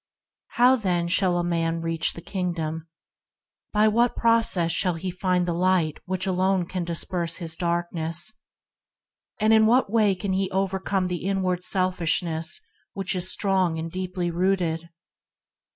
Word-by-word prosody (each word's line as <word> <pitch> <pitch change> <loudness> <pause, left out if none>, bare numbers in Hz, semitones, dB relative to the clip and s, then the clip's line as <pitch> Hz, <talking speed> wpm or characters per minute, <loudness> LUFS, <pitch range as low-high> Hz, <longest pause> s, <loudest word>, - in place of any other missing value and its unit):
T - - -12
TOW 250 +2 +6
then 180 -6 0
shall 180 +1 +2
a 175 - 0
man 165 -1 -1
reach 165 -1 -1
the 170 - -9
Kingdom? 165 -4 -3 0.4
~ - - -63
By 210 0 +4
what 235 +3 +2
process 225 -7 +2
shall 180 +1 +1
he 180 +3 -4
find 180 0 0
the 175 - 0
light 175 -3 +1
that 185 +1 -2
alone 190 -1 +1
can 180 0 -4
disperse 170 0 -2
his 165 -2 -2
darkness? 170 +1 -2 1.1
In 220 0 +5
what 240 -2 +3
way 215 -4 +3
can 190 +1 -3
he 190 0 0
overcome 190 0 -1
the 180 -1 -3
inward 185 -2 0
selfishness 175 -3 0 0.3
which 195 -1 -1
is 185 0 +2
strong, 190 -5 +1
and 165 +1 -5
deeply 180 -1 -3
rooted 170 -2 0
180 Hz, 150 wpm, -25 LUFS, 170-195 Hz, 1.1 s, TOW